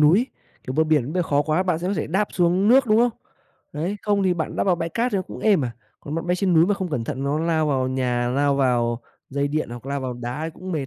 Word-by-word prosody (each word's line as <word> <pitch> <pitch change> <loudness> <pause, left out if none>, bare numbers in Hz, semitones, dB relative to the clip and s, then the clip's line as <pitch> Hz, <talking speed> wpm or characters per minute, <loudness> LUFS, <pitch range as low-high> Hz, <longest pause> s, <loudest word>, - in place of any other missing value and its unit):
núi. 175 +11 +5 0.4
Kiểu, 130 - -3
bờ 160 +1 +3
biển 150 -3 +1
bơi 180 0 +1
khó 145 -2 +1
quá 155 +4 +1
bạn 180 -4 0
sẽ 180 +2 -3
có 200 - 0
thể - - -2
đáp 195 +6 0
xuống 180 +3 +2
nước, 265 +1 +6
đúng 215 - +4
không? 240 +1 +4 0.6
Đấy, 170 +7 -2
không 205 -1 +1
thì 185 -2 +2
bạn 160 -2 -3
đáp - - +1
vào 185 - +3
bãi 165 0 -2
cát 235 +7 -1
thì 200 - +2
nó 185 - 0
cũng - - -10
êm 200 -10 +3
à, 120 - -3 0.3
còn 145 - -6
bạn 165 +1 -3
bay 180 +1 +1
trên 185 -2 +1
núi 165 +2 +6
mà 205 - +2
không 190 -2 -3
cẩn 120 -7 -2
thận 135 +4 -4
nó 145 +2 0
lao 160 -2 +1
vào 130 -3 +1
nhà, 125 -2 0
lao 140 +3 +2
vào 120 -3 +1 0.3
dây 140 +1 -1
điện, 155 -3 -2
hoặc 120 +2 -8
lao 140 0 -2
vào 130 -1 -3
đá 120 +5 -5
thì 165 - -3
cũng 185 +1 -7
mệt. 145 -5 -2
155 Hz, 295 wpm, -23 LUFS, 135-185 Hz, 0.6 s, nước